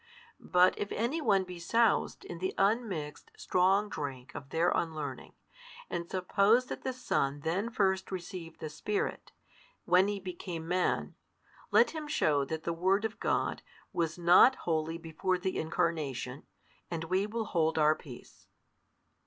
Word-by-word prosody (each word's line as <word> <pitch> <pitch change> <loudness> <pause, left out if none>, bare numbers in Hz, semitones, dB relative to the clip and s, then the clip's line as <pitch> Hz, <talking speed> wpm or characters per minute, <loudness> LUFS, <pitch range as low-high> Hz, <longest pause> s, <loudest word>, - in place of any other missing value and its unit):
But 180 +1 +4
if 205 - -3
any 250 +9 -1
one 200 -8 +3
be 180 -1 -9
soused 230 +7 +1
in 175 - -7
the 185 +1 -2
unmixed 195 -8 -1
strong 190 +3 +2
drink 135 -8 -6
of 135 - -8
their 165 +4 +2
unlearning, 155 -3 -3 0.6
and 170 0 -3
suppose 200 +6 +3
that - - -6
the 260 - -1
Son 145 - -1
then 185 +9 -1
first 190 -4 0
received 175 -2 -7
the 155 - -4
Spirit, 205 +6 -3 0.5
when 185 +2 +5
He 205 -1 -2
became 175 -3 -6
Man: 180 +1 0 0.6
let - - +5
him 315 -2 -6
shew 150 - +2
that 160 +2 -4
the 170 - -1
Word 190 +5 +2
of 220 0 -4
God - - 0 0.3
was 165 0 -1
not 175 +9 +7
holy 160 0 0
before 165 +3 -1
the 185 +1 -2
Incarnation, 150 -5 -2 0.4
and 165 -2 -3
we 185 +4 0
will 225 +1 -3
hold 160 -4 +1
our 155 0 +5
peace. 130 -5 -13
180 Hz, 150 wpm, -31 LUFS, 160-200 Hz, 0.6 s, not